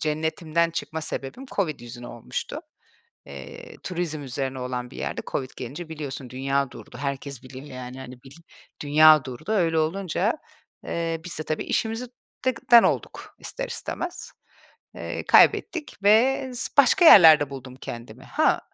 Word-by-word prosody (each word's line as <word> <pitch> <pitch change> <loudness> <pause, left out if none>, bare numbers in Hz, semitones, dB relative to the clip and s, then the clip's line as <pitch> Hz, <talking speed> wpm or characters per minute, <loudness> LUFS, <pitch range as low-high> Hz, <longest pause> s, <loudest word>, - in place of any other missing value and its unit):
cennetimden 160 +2 0
çıkma 160 -1 -4
sebebim 155 - -5
COVID 160 -8 -1
yüzüne 120 0 -9
olmuştu. 120 -1 -6 0.7
Eee, 70 -2 -10
turizm 170 -4 -3
üzerine 135 0 -4
olan 125 -1 -4
bir - - -12
yerde - - -3
COVID 130 -2 -2
gelince, 145 +7 -7
biliyorsun, 140 -5 -6
dünya 135 +1 -1
durdu. - - -12
Herkes 140 -2 -4
biliyor, 130 +2 -10
yani, 125 -1 -8
hani, 130 -1 -9
bil 135 +2 -14 0.5
dünya 155 0 +6
durdu. 135 - -6
Öyle 165 -6 +2
olunca, 185 +5 0 0.5
eee, 165 -1 -2
biz 175 -4 -3
de - - -1
tabii 155 0 -3
işimizi 225 +2 -1 0.4
dek 255 -1 -2
den 235 -1 +10
olduk - - -2
ister - - -5
istemez. 355 -6 -5 0.6
Eee, - - -5
kaybettik 335 -8 +4
ve 255 +6 +4
s 245 - -2
başka 280 +6 +6
yerlerde 160 - +9
buldum 130 -2 -9
kendimi. 120 +1 -9
Ha, 310 - +2
155 Hz, 145 wpm, -25 LUFS, 130-180 Hz, 0.7 s, den